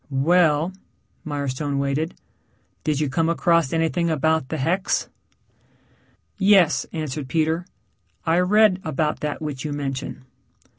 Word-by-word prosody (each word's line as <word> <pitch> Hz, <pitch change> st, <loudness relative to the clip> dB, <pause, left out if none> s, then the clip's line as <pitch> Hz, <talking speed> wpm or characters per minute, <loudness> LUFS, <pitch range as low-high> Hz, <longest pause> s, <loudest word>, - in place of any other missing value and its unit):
"Well," 160 Hz, +3 st, +2 dB, 0.5 s
Mirestone 140 Hz, -1 st, -3 dB
waited. 140 Hz, +4 st, -1 dB, 0.7 s
"Did 150 Hz, -2 st, 0 dB
you 150 Hz, -, +1 dB
come 160 Hz, +5 st, 0 dB
across 170 Hz, -3 st, +2 dB
anything 165 Hz, +1 st, 0 dB
about 160 Hz, -2 st, +1 dB
the 160 Hz, -, -2 dB
hex?" 175 Hz, +8 st, 0 dB, 1.3 s
"Yes," 195 Hz, -5 st, +4 dB
answered 150 Hz, -4 st, -4 dB
Peter. 160 Hz, +4 st, 0 dB, 0.6 s
"I 165 Hz, +1 st, +3 dB
read 190 Hz, +1 st, +4 dB
about 155 Hz, 0 st, -1 dB
that 150 Hz, +1 st, -4 dB
which 145 Hz, -4 st, -4 dB
you 150 Hz, -, -3 dB
mention." 135 Hz, -2 st, -5 dB
155 Hz, 115 wpm, -23 LUFS, 145-170 Hz, 1.3 s, Yes